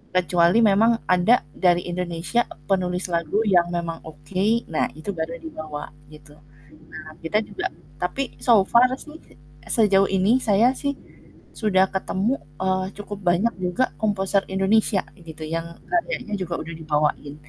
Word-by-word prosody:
kecuali 175 Hz, +1 st, +3 dB
memang 220 Hz, +4 st, +4 dB
ada 180 Hz, +2 st, +3 dB
dari 175 Hz, -1 st, +2 dB
Indonesia 175 Hz, +5 st, -1 dB, 0.2 s
penulis 180 Hz, -1 st, 0 dB
lagu 170 Hz, +3 st, 0 dB
yang 175 Hz, -4 st, +3 dB
memang 170 Hz, -1 st, -3 dB
oke, 185 Hz, +9 st, -1 dB
nah -, -, +1 dB
itu 180 Hz, +6 st, -5 dB
baru 165 Hz, 0 st, -4 dB
dibawa 155 Hz, -2 st, -8 dB, 0.2 s
gitu. 150 Hz, -1 st, -15 dB, 0.6 s
Nah 155 Hz, -1 st, -10 dB
kita 210 Hz, +7 st, 0 dB
juga 200 Hz, -, -4 dB, 0.3 s
tapi 180 Hz, +10 st, -1 dB, 0.2 s
so 225 Hz, -6 st, +5 dB
far 240 Hz, +5 st, +5 dB
sih 305 Hz, +3 st, -12 dB, 0.5 s
sejauh 195 Hz, -3 st, +4 dB
ini 195 Hz, +7 st, +3 dB
saya 225 Hz, +3 st, +4 dB
sih 280 Hz, +1 st, -3 dB, 0.6 s
sudah 190 Hz, -4 st, +3 dB
ketemu, 195 Hz, +6 st, 0 dB, 0.2 s
eee, 185 Hz, 0 st, +1 dB
cukup 205 Hz, -1 st, -7 dB
banyak 190 Hz, +7 st, +2 dB
juga 180 Hz, +8 st, +1 dB, 0.2 s
komposer 200 Hz, -2 st, +1 dB
Indonesia 195 Hz, +1 st, +2 dB, 0.2 s
gitu 160 Hz, -3 st, -11 dB
yang 165 Hz, +1 st, -3 dB, 0.2 s
karyanya 345 Hz, -, -1 dB
juga 180 Hz, -3 st, -4 dB
udah 165 Hz, -, -7 dB
dibawain, 150 Hz, -2 st, -1 dB
185 Hz, 135 wpm, -23 LUFS, 170-210 Hz, 0.6 s, so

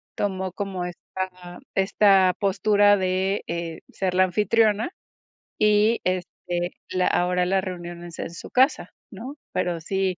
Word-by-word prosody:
tomó 190 Hz, -2 st, -2 dB
como 190 Hz, -2 st, -4 dB
esta 180 Hz, 0 st, -7 dB, 0.2 s
esta 195 Hz, -1 st, +4 dB
postura 205 Hz, +1 st, +4 dB
de, 190 Hz, +1 st, 0 dB
eh, 170 Hz, -1 st, -4 dB
ser 185 Hz, -2 st, -2 dB
la 185 Hz, -, +5 dB
anfitriona 210 Hz, -, +2 dB, 0.7 s
y, 210 Hz, +2 st, +3 dB
este, 175 Hz, -1 st, -2 dB, 0.2 s
la 185 Hz, -1 st, +1 dB
ahora 180 Hz, 0 st, +2 dB
la 190 Hz, +1 st, +2 dB
reunión 175 Hz, -2 st, -7 dB
es 170 Hz, -1 st, -10 dB
en -, -, -3 dB
su 170 Hz, -, -9 dB
casa, 265 Hz, +4 st, +2 dB, 0.2 s
¿no? 275 Hz, +5 st, -8 dB, 0.2 s
Pero 175 Hz, -2 st, -1 dB
sí, 190 Hz, +1 st, -1 dB
185 Hz, 135 wpm, -24 LUFS, 180-205 Hz, 0.7 s, la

